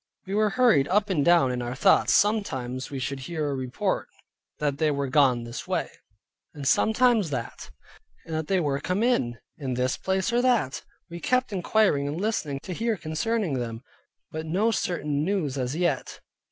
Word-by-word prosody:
We 195 Hz, -, -5 dB
were 215 Hz, +1 st, +3 dB
hurried 205 Hz, -, +4 dB
up 200 Hz, +1 st, +1 dB
and 150 Hz, -6 st, +2 dB
down 170 Hz, -6 st, +4 dB
in 125 Hz, 0 st, -2 dB
our 120 Hz, +1 st, -4 dB
thoughts, 190 Hz, +8 st, +4 dB
sometime 135 Hz, -, +1 dB
we 140 Hz, -, -5 dB
should 135 Hz, +1 st, -3 dB
hear 155 Hz, +2 st, -3 dB
a 145 Hz, -, -1 dB
report 130 Hz, -2 st, -2 dB, 0.5 s
that 145 Hz, -1 st, -1 dB
they 155 Hz, -, +3 dB
were 140 Hz, -1 st, -1 dB
gone 130 Hz, -3 st, +3 dB
this 120 Hz, 0 st, -7 dB
way, -, -, -1 dB, 0.6 s
and 140 Hz, -2 st, -4 dB
sometimes 220 Hz, -, +3 dB
that; 125 Hz, -5 st, -5 dB, 0.6 s
and 165 Hz, -, -7 dB
that 155 Hz, -1 st, -2 dB
they 190 Hz, -1 st, +2 dB
were 140 Hz, -4 st, 0 dB
come 185 Hz, +8 st, -1 dB
in, 180 Hz, -, +1 dB, 0.2 s
in 130 Hz, -4 st, -3 dB
this 125 Hz, +1 st, 0 dB
place 190 Hz, +4 st, -1 dB
or 240 Hz, -, +3 dB
that. 240 Hz, -, +1 dB, 0.3 s
We 170 Hz, -, -6 dB
kept 255 Hz, +2 st, 0 dB
inquiring 185 Hz, -6 st, +2 dB
and 150 Hz, +4 st, -3 dB
listening 160 Hz, -10 st, -2 dB
to 185 Hz, -, -5 dB
hear 225 Hz, +3 st, -1 dB
concerning 160 Hz, -, -1 dB
them, 115 Hz, 0 st, -5 dB, 0.5 s
but 160 Hz, +1 st, -5 dB
no 200 Hz, +8 st, +2 dB
certain 150 Hz, -8 st, -1 dB
news 170 Hz, -7 st, -1 dB
as 130 Hz, +1 st, -2 dB
yet. 170 Hz, -6 st, -1 dB
155 Hz, 180 wpm, -26 LUFS, 135-205 Hz, 0.6 s, hurried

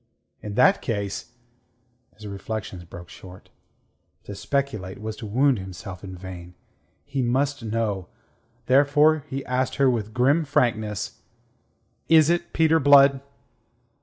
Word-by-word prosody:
In 105 Hz, -1 st, -6 dB
that 130 Hz, -, +4 dB
case... 100 Hz, -1 st, -4 dB, 0.8 s
His 105 Hz, -, -13 dB
reflections 100 Hz, -2 st, -6 dB
broke 85 Hz, +1 st, -11 dB
short. 90 Hz, +1 st, -14 dB, 0.7 s
To 100 Hz, -, -8 dB
speculate 110 Hz, -6 st, -3 dB
was 110 Hz, 0 st, -5 dB
to 110 Hz, -, -7 dB
wound 130 Hz, +3 st, +2 dB
himself 95 Hz, 0 st, -9 dB
in 95 Hz, -1 st, -8 dB
vain. 90 Hz, -1 st, -10 dB, 0.5 s
He 140 Hz, -1 st, -3 dB
must 135 Hz, +4 st, 0 dB
know. 105 Hz, -4 st, -2 dB, 0.6 s
Therefore 145 Hz, +3 st, +4 dB
he 135 Hz, 0 st, -5 dB
asked 125 Hz, 0 st, -1 dB
her 135 Hz, -2 st, +3 dB
with 110 Hz, -3 st, -3 dB
grim 135 Hz, +8 st, +2 dB
frankness: 110 Hz, -7 st, -1 dB, 0.9 s
"Is 160 Hz, 0 st, +6 dB
it 175 Hz, 0 st, -1 dB
Peter 160 Hz, 0 st, +3 dB
Blood?" 140 Hz, -1 st, +6 dB
115 Hz, 125 wpm, -24 LUFS, 100-140 Hz, 0.9 s, Is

